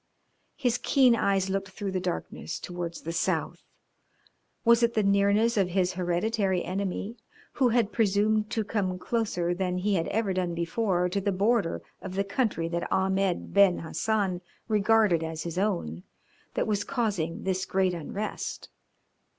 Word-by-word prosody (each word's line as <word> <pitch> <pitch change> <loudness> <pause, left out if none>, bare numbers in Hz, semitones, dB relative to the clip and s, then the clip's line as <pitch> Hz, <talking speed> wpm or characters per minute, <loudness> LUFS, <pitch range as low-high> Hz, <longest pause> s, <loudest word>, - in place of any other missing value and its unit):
His 245 -1 0
keen 255 -2 +4
eyes 195 -3 +1
looked 195 0 -2
through 195 +1 -5
the 185 - -1
darkness 80 - -4
towards 175 -2 -5
the 165 - -4
south. 165 - -1 1.0
Was 235 0 +6
it 235 0 +2
the 215 - +3
nearness 200 +3 +3
of 190 -3 +2
his 185 0 +1
hereditary 185 +1 0
enemy, 195 +4 -3 0.4
who 255 -3 +3
had 230 -3 +2
presumed 215 0 +2
to 220 - -1
come 195 -4 -1
closer 180 -5 -1
than 180 0 -1
he 200 +3 0
had 165 -3 0
ever 215 -3 0
done 180 -2 -1
before 180 +1 0
to 200 +2 -1
the 200 +1 0
border 200 -1 +1 0.2
of 190 -1 -7
the 195 - +1
country 200 -5 -1
that 170 0 -3
Ahmed 190 -1 0
Ben 200 -3 +5
Hassan 185 +2 -1 0.3
regarded 215 -5 +3
as 160 -1 -4
his 170 +1 -3
own, 175 - -1 0.5
that - - +1
was 205 -2 0
causing 205 -11 -2
this 185 -1 0
great 190 -1 +1
unrest? 195 +6 -5
195 Hz, 155 wpm, -28 LUFS, 180-215 Hz, 1.0 s, Was